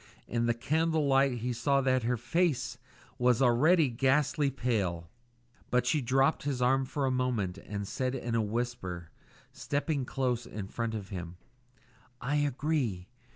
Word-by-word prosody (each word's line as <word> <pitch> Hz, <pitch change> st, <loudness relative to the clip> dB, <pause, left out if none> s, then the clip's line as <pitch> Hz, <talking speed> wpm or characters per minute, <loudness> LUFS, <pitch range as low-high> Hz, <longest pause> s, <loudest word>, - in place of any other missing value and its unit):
In 120 Hz, 0 st, 0 dB
the 120 Hz, -, +2 dB
candle 160 Hz, +4 st, +1 dB
light 135 Hz, -3 st, +3 dB
he 125 Hz, +1 st, -1 dB
saw 140 Hz, +4 st, +2 dB
that 130 Hz, -1 st, +2 dB
her 120 Hz, +1 st, 0 dB
face 165 Hz, +4 st, 0 dB, 0.4 s
was 125 Hz, -1 st, +3 dB
already 145 Hz, +6 st, +4 dB
ghastly 135 Hz, +4 st, +2 dB
pale; 100 Hz, -10 st, -2 dB, 0.6 s
but 125 Hz, 0 st, +2 dB
she 145 Hz, +4 st, +2 dB
dropped 135 Hz, +4 st, +2 dB
his 140 Hz, -3 st, -2 dB
arm 130 Hz, +2 st, +3 dB
for 140 Hz, +1 st, -2 dB
a 130 Hz, -, +1 dB
moment 120 Hz, -8 st, -1 dB
and 100 Hz, 0 st, -5 dB
said 130 Hz, +4 st, -2 dB
in 120 Hz, -2 st, -3 dB
a 115 Hz, -, +2 dB
whisper, 105 Hz, -6 st, -3 dB, 0.4 s
stepping 145 Hz, -1 st, -2 dB
close 125 Hz, -2 st, -1 dB
in 100 Hz, -2 st, -6 dB
front 115 Hz, 0 st, -3 dB
of 100 Hz, -2 st, -6 dB
him 90 Hz, -3 st, -6 dB, 0.8 s
"I 145 Hz, +4 st, -1 dB
agree. 140 Hz, -, -1 dB
125 Hz, 155 wpm, -30 LUFS, 115-140 Hz, 0.8 s, already